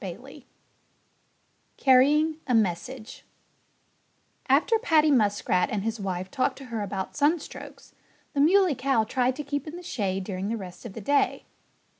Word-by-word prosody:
XV -, -, -9 dB, 1.3 s
CARRYING 295 Hz, +4 st, +4 dB
A 250 Hz, -, +2 dB
MESSAGE 220 Hz, +4 st, -2 dB, 1.3 s
After 320 Hz, -, +3 dB
Paddy 315 Hz, -9 st, +3 dB
Muskrat 205 Hz, -6 st, +2 dB
and 205 Hz, -2 st, -2 dB
his 225 Hz, 0 st, -3 dB
wife 185 Hz, -1 st, -4 dB
talked 260 Hz, +1 st, 0 dB
to 275 Hz, -, -10 dB
her 220 Hz, -, -2 dB
about 195 Hz, -1 st, -4 dB
sunstrokes, 295 Hz, +2 st, -2 dB, 0.4 s
the 280 Hz, -, +1 dB
Muley 365 Hz, +2 st, +4 dB
Cow 260 Hz, -3 st, +1 dB
tried 250 Hz, +3 st, 0 dB
to 295 Hz, -, -5 dB
keep 285 Hz, +1 st, -4 dB
in 305 Hz, -, -7 dB
the 355 Hz, -, -9 dB
shade 195 Hz, -, -2 dB
during 190 Hz, +1 st, -4 dB
the 230 Hz, -, -2 dB
rest 190 Hz, +3 st, -9 dB
of 200 Hz, -, -11 dB
the 225 Hz, -, -7 dB
day. 285 Hz, +7 st, +1 dB
255 Hz, 150 wpm, -26 LUFS, 205-290 Hz, 1.3 s, CARRYING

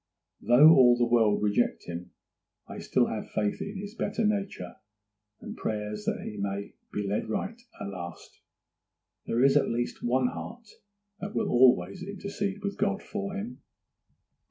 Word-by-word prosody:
Though 135 Hz, +6 st, +7 dB
all 125 Hz, -5 st, +7 dB
the 120 Hz, -, +3 dB
world 115 Hz, -4 st, +3 dB
reject 105 Hz, -1 st, +1 dB
him, 85 Hz, +1 st, -7 dB, 0.6 s
I -, -, -8 dB
still -, -, +2 dB
have -, -, -4 dB
faith 105 Hz, -1 st, -1 dB
in 200 Hz, 0 st, -5 dB
this 205 Hz, +1 st, -7 dB
better 225 Hz, -1 st, -1 dB
nature, 200 Hz, -, -2 dB, 0.6 s
and -, -, -8 dB
prayers 105 Hz, -1 st, -4 dB
that -, -, -1 dB
he 105 Hz, -, -6 dB
may 100 Hz, 0 st, -3 dB, 0.2 s
be 105 Hz, -1 st, -2 dB
led 105 Hz, +2 st, -2 dB
right 200 Hz, -, -3 dB, 0.2 s
at 100 Hz, -, -5 dB
last. 85 Hz, -3 st, -8 dB, 0.9 s
There 120 Hz, +2 st, +2 dB
is 135 Hz, 0 st, +5 dB
at 145 Hz, -, +3 dB
least 120 Hz, +1 st, -2 dB
one 125 Hz, +1 st, +2 dB
heart 235 Hz, +2 st, -8 dB, 0.5 s
that 200 Hz, +2 st, -6 dB
will -, -, 0 dB
always 120 Hz, -8 st, +4 dB
intercede 200 Hz, 0 st, -4 dB
with 200 Hz, 0 st, -3 dB
God 200 Hz, 0 st, 0 dB
for 200 Hz, -1 st, -4 dB
him. 210 Hz, +5 st, -6 dB
125 Hz, 155 wpm, -28 LUFS, -, 0.9 s, Though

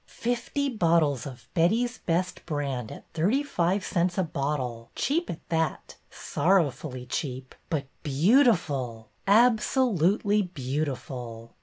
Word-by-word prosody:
'' -, -, -42 dB, 0.3 s
Fifty 250 Hz, +4 st, -1 dB
bottles 165 Hz, -, +2 dB
of 125 Hz, -4 st, -11 dB
Betty's 225 Hz, +9 st, +2 dB
Best 180 Hz, +2 st, -1 dB
Brand 140 Hz, -7 st, -2 dB
at -, -, -10 dB
thirty 205 Hz, -, +2 dB
five 185 Hz, -7 st, 0 dB
cents 175 Hz, 0 st, 0 dB
a 190 Hz, -, +3 dB
bottle, 135 Hz, -7 st, -3 dB
cheap 335 Hz, +5 st, 0 dB
at 165 Hz, -, -7 dB
that, 160 Hz, -3 st, -1 dB
— -, -, -40 dB
sorrowfully 145 Hz, -6 st, 0 dB
cheap, 130 Hz, 0 st, -4 dB
— -, -, -40 dB
but 145 Hz, -4 st, -1 dB, 0.2 s
beautiful, 145 Hz, -, +2 dB, 0.2 s
absolutely 210 Hz, -, +3 dB
beautiful 130 Hz, -, -4 dB
165 Hz, 125 wpm, -27 LUFS, 135-205 Hz, 0.3 s, a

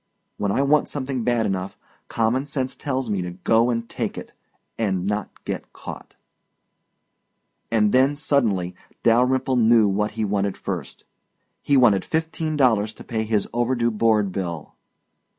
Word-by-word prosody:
When 100 Hz, -1 st, -1 dB
I 135 Hz, -, +2 dB
want 150 Hz, +2 st, +3 dB
something 130 Hz, -3 st, -3 dB
bad 120 Hz, -1 st, +1 dB
enough, 95 Hz, 0 st, -3 dB, 0.3 s
common 120 Hz, +5 st, 0 dB
sense 135 Hz, -2 st, -2 dB
tells 130 Hz, -5 st, -3 dB
me 100 Hz, -3 st, 0 dB
to 90 Hz, -, -4 dB
go 115 Hz, +2 st, +4 dB
and 115 Hz, -1 st, -1 dB
take -, -, -4 dB
it -, -, -8 dB, 0.4 s
and 95 Hz, -5 st, -1 dB
not 105 Hz, 0 st, -2 dB, 0.2 s
get -, -, -5 dB
caught. -, -, -10 dB, 1.5 s
And 105 Hz, -2 st, +3 dB
then 135 Hz, +3 st, +4 dB
suddenly 110 Hz, -, +1 dB, 0.3 s
Dalyrimple 125 Hz, +2 st, +3 dB
knew 115 Hz, -1 st, +5 dB
what 105 Hz, +2 st, 0 dB
he 110 Hz, -, 0 dB
wanted 100 Hz, -1 st, -1 dB
first. -, -, -6 dB, 0.6 s
He 140 Hz, -, +3 dB
wanted 110 Hz, -7 st, +5 dB
fifteen 160 Hz, -1 st, -2 dB
dollars 110 Hz, -5 st, +2 dB
to -, -, -11 dB
pay 110 Hz, -1 st, -2 dB
his 105 Hz, -2 st, 0 dB
overdue 120 Hz, 0 st, +1 dB
board 105 Hz, -2 st, +2 dB
bill. 85 Hz, -5 st, -5 dB
115 Hz, 150 wpm, -23 LUFS, 105-130 Hz, 1.5 s, knew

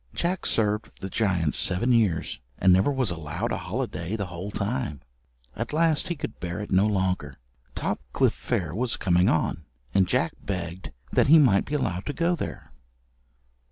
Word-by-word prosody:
Jack 180 Hz, +2 st, -1 dB
served 105 Hz, -1 st, 0 dB
the 95 Hz, -, -6 dB
giant 90 Hz, -8 st, +1 dB
seven 115 Hz, +8 st, +1 dB
years, 105 Hz, -9 st, +1 dB, 0.2 s
and 95 Hz, -1 st, +5 dB
never 95 Hz, +9 st, +4 dB
was 130 Hz, -7 st, 0 dB
allowed 75 Hz, -3 st, -3 dB
a -, -, 0 dB
holiday 85 Hz, +6 st, -3 dB
the 100 Hz, -3 st, -2 dB
whole 90 Hz, +2 st, -6 dB
time. 105 Hz, -, -2 dB, 0.6 s
At 115 Hz, +5 st, -4 dB
last 165 Hz, +1 st, +2 dB
he 175 Hz, -, -2 dB
could 140 Hz, -7 st, -6 dB
bear 85 Hz, +2 st, -4 dB
it 105 Hz, -, -6 dB
no 95 Hz, +3 st, +4 dB
longer. 90 Hz, -8 st, -1 dB, 0.4 s
Topcliffe -, -, 0 dB
fair -, -, -2 dB
was 120 Hz, +4 st, 0 dB
coming 90 Hz, 0 st, +3 dB
on, 80 Hz, 0 st, 0 dB, 0.3 s
and 95 Hz, -2 st, +4 dB
Jack -, -, +1 dB
begged 90 Hz, -1 st, -4 dB, 0.2 s
that -, -, +4 dB
he 160 Hz, +4 st, +8 dB
might 125 Hz, -10 st, +5 dB
be 150 Hz, -, -3 dB
allowed 100 Hz, -10 st, -2 dB
to 145 Hz, -, -1 dB
go 170 Hz, +2 st, +1 dB
there. -, -, -6 dB
100 Hz, 170 wpm, -26 LUFS, 90-125 Hz, 0.6 s, he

